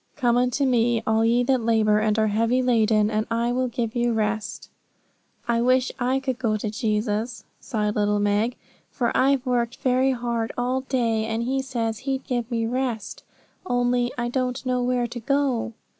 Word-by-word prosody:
'Come 240 -4 +2
unto 250 +3 +1
Me, 240 -2 +2
all 220 0 +2
ye 235 +2 +3
that 260 0 +1
labour 220 -2 +3
and 215 0 +1
are 220 - +3
heavy 230 +4 +1
laden, 220 -3 +3
and 215 0 -1
I 230 +1 0
will 255 +1 0
give 235 -2 -3
you 240 -1 +1
rest.' 215 -1 -2 0.8
'I 235 -1 +2
wish 255 +1 +2
I 255 +2 +1
could 260 -2 -3
go 220 -4 0
to 210 0 -4
Jesus,' 220 0 -2 0.2
sighed 210 -2 -2
little 210 0 +1
Meg, 205 +4 +1 0.3
'for 240 -3 -1
I've 270 0 +3
worked 245 -1 0
very 260 +1 +2
hard 235 -2 -2
all 250 +2 0
day; 230 -4 0
and 225 +1 -2
He 265 +2 0
says 230 -4 -3
He'd 270 0 -3
give 240 -2 -2
me 230 -2 -1
rest. 240 -3 -3 0.4
Only 245 -4 +1
I 240 -1 -1
don't 255 +1 -2
know 250 -1 0
where 245 0 +1
to 240 +1 -6
go.' 260 -2 0
240 Hz, 180 wpm, -24 LUFS, 225-255 Hz, 0.8 s, ye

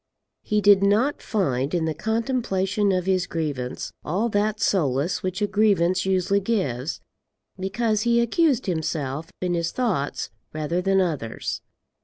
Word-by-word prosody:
He 210 0 0
did 200 -1 +6
not 215 +9 +2
find 145 - 0
in 165 -2 +1
the 160 - -1
contemplation 210 - 0
of 185 -1 0
his 185 -2 +1
grievance 145 -6 -3
all 200 +9 0
that 210 0 0
solace 150 -4 +1
which 185 +2 -2
a - - +5
grievance 190 -3 +2
usually 190 +1 +2
gives, 165 - -2 0.6
because 215 +3 0
he 235 0 +3
accused 260 +3 +2
himself 160 -4 -2
in 180 -1 0
his 170 -1 -1
thoughts 205 - -1 0.2
rather 155 +3 -1
than 195 +1 +3
others. 150 -11 -3
190 Hz, 140 wpm, -24 LUFS, 160-210 Hz, 0.6 s, did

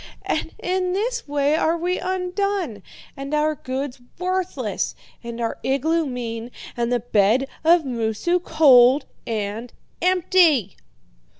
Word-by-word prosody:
And - - -2
in 365 0 -1
this 460 +3 -2
way 290 +1 +1
are 325 +1 +1
we 355 +2 -1
undone, 370 - -2 0.3
and 275 +1 -4
our 305 +1 +2
goods 260 -2 -5 0.2
worthless, 370 +1 -2 0.3
and 235 0 -6
our 230 -1 -2
igloo 310 +4 +1
mean, 235 -2 -5 0.3
and 235 0 -1
the 245 -2 +1
bed 225 +3 +2 0.2
of 330 0 +5
Moosu 240 - 0
cold 275 -4 +6 0.2
and 220 +1 -3 0.3
empty!' 345 - +3
290 Hz, 120 wpm, -22 LUFS, 240-360 Hz, 0.3 s, cold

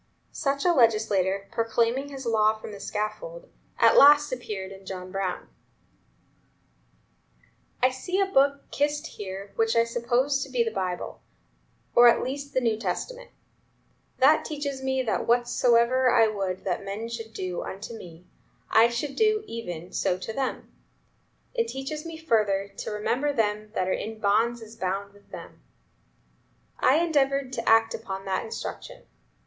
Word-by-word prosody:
Such 280 +2 -1
a 350 - +5
legislator, 210 - +2
proclaiming 230 +4 0
his 270 -2 -8
law 220 -1 +3
from 215 - -9
the 200 - -9
scaffold, - - -5 0.3
at - - +5
last 295 +1 +7
appeared 210 -6 -5
in 195 0 -12
John 185 -1 -7
Brown: 195 -2 -3 2.4
"I 255 - +5
see 360 +9 -3
a 390 - +4
book 280 -6 +1
kissed 295 +2 0
here 200 -5 -7
which 225 0 +2
I 230 - +5
suppose 240 +4 0
to 275 - -9
be 250 -2 +1
the 225 - -2
Bible, 185 -3 -4 0.7
or 240 0 +8
at 235 - +4
least 280 +2 -5
the 260 - +3
New 225 -3 +1
Testament. - - -4 0.9
That - - +5
teaches 285 -3 -4
me 265 0 0
that 225 - -1
'whatsoever 240 +1 +3
I 230 -1 +5
would 195 -3 -3
that 185 0 -2
men 200 +3 -5
should 230 -1 -7
do 185 -4 -4
unto 200 +4 -7
me, 175 -5 -11 0.5
I 225 +1 +7
should 245 +4 -3
do 430 -1 +2
even 180 - -7
so 180 - 0
to 220 +4 -6
them.' 265 +2 -4 0.8
It 465 -2 0
teaches 300 0 -5
me 330 -1 -7
further 210 -10 +1
to - - -5
'remember 245 +7 -1
them 210 -2 -1
that 185 - 0
are 185 - +1
in 220 +1 -5
bonds 225 +3 +1
as 225 +1 -12
bound 195 +2 -3
with 205 0 -22
them.' - - -11 1.2
I 260 - +4
endeavored 275 -5 +1
to 230 -2 -1
act 225 0 +5
up - - -5 0.2
to 195 - -15
that 190 -1 -1
instruction. - - -7
230 Hz, 155 wpm, -26 LUFS, 205-275 Hz, 2.4 s, or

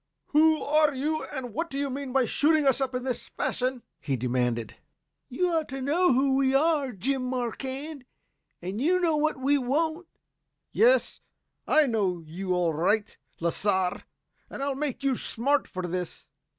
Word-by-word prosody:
"Who 315 +1 +4
are 300 -1 +3
you 310 +4 -1
and 255 -5 -6
what 335 +7 -2
do 275 - -5
you 280 -1 -1
mean 275 0 -5
by 265 -1 +3
shooting 300 +5 +2
us 270 0 +3
up 260 -1 -1
in 250 - -2
this 255 -2 -3
fashion?" 255 -1 -2 0.2
he 140 -2 -2
demanded. 120 -2 -1 0.5
"You 355 +7 0
ought 320 -2 0
to 270 +1 -5
know 320 +7 +2
who 265 +1 +3
we 270 0 +2
are, 290 -2 +2
Jim 255 +6 -2
Marquand, 260 +3 -4 0.6
and 190 +6 -4
you 360 +6 +3
know 335 -3 +2
what 310 0 +1
we 280 +2 +2
want!" 315 +7 -1 0.6
"Yes, - - +3 0.5
I 310 -1 +5
know 195 -9 0
you 185 +4 -5
all 175 -2 +1
right, 200 +7 0 0.2
Lasar, 185 +2 0 0.5
and 275 - -5
I'll 280 0 0
make 275 -1 -3
you 270 -2 +2
smart 275 +5 +1
for 185 -3 -6
this." 180 0 -5
265 Hz, 165 wpm, -27 LUFS, 210-300 Hz, 0.6 s, I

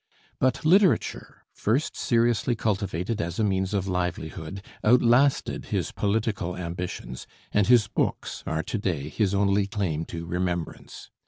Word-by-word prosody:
But 130 +3 +1
literature, 185 +1 +2
first 125 +8 0
seriously 120 0 +2
cultivated 100 -1 -1
as 85 0 -4
a 110 - +1
means 95 -2 0
of 100 -2 -1
livelihood, 90 0 -3 0.2
outlasted 125 +4 +3
his - - -2
political 100 -4 -1
ambitions, 85 -8 -5 0.2
and 105 -2 +2
his 120 -4 +5
books - - -2
are 80 0 -1
to 110 - -3
day 80 -8 -2
his 100 +5 0
only 100 0 +2
claim 95 -7 -2
to 85 0 -6
remembrance. 90 -1 -4
100 Hz, 135 wpm, -26 LUFS, 85-115 Hz, 0.2 s, his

